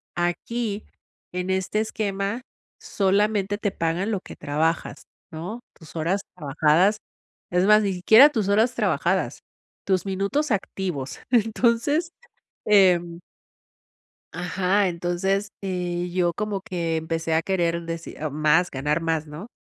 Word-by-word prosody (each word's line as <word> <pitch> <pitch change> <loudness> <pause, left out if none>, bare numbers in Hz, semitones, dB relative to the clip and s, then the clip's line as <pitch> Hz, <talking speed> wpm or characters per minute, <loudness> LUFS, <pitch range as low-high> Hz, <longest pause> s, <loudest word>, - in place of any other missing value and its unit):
Aquí, 205 +5 -2 0.5
en 180 +1 -3
este 190 +3 0
esquema, 205 +1 -2 0.4
solamente 205 0 +1
te 205 -2 -1
pagan 175 +5 -1
lo 195 -3 -1
que - - -11
trabajas, 160 +3 -1 0.3
¿no?, 180 +9 -6
tus 160 -1 -16
horas 180 +5 0
trabajadas, 160 +6 +2 0.5
es 180 +2 +2
más, 210 0 +6
ni 200 - 0
siquiera 220 +10 +7
tus 220 -9 -1
horas 220 +4 +3
trabajadas, - - 0 0.5
tus 190 0 +1
minutos 200 +10 -1
activos. 185 -8 -3
Entonces, 235 +8 +2 0.5
em 180 -4 +4 1.1
ajá, 185 +3 +1
entonces, 180 +4 -1
eh, 180 -2 -2
yo 175 -2 +1
como 210 -2 -2
que 170 -3 -2
empecé 160 0 -2
a 160 - +2
querer 170 -3 0
decir 165 0 -6
más, 155 +4 +2
ganar 150 +4 -1
más, 160 -1 -1
¿no? 150 +8 -8
185 Hz, 120 wpm, -24 LUFS, 170-205 Hz, 1.1 s, siquiera